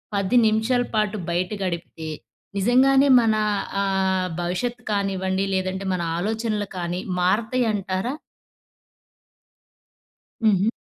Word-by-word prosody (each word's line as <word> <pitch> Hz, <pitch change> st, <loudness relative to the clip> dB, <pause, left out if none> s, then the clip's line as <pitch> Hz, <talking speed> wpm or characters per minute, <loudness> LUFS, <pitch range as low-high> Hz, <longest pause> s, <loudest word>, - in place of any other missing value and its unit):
10 200 Hz, +5 st, +2 dB
నిమిషాల 225 Hz, +3 st, +2 dB
పాటు 215 Hz, 0 st, +1 dB
బయట 175 Hz, +1 st, 0 dB
గడిపితే, 170 Hz, -3 st, -4 dB, 0.5 s
నిజంగానే 265 Hz, +6 st, +4 dB
మన 225 Hz, -1 st, +2 dB, 0.5 s
ఆహ్, 190 Hz, -1 st, +1 dB
భవిష్యత్తుకనివ్వండి 195 Hz, -1 st, -1 dB
లేదంటే 190 Hz, +1 st, -2 dB
మన 180 Hz, -, -3 dB, 0.2 s
ఆలోచనలు 215 Hz, +1 st, -2 dB
కానీ 175 Hz, 0 st, -2 dB, 0.2 s
మారతాయి 225 Hz, +7 st, +1 dB
అంటారా? 195 Hz, +4 st, -2 dB, 2.3 s
హు‌హు‌. 205 Hz, -1 st, +4 dB
200 Hz, 90 wpm, -23 LUFS, 185-225 Hz, 2.3 s, నిజంగానే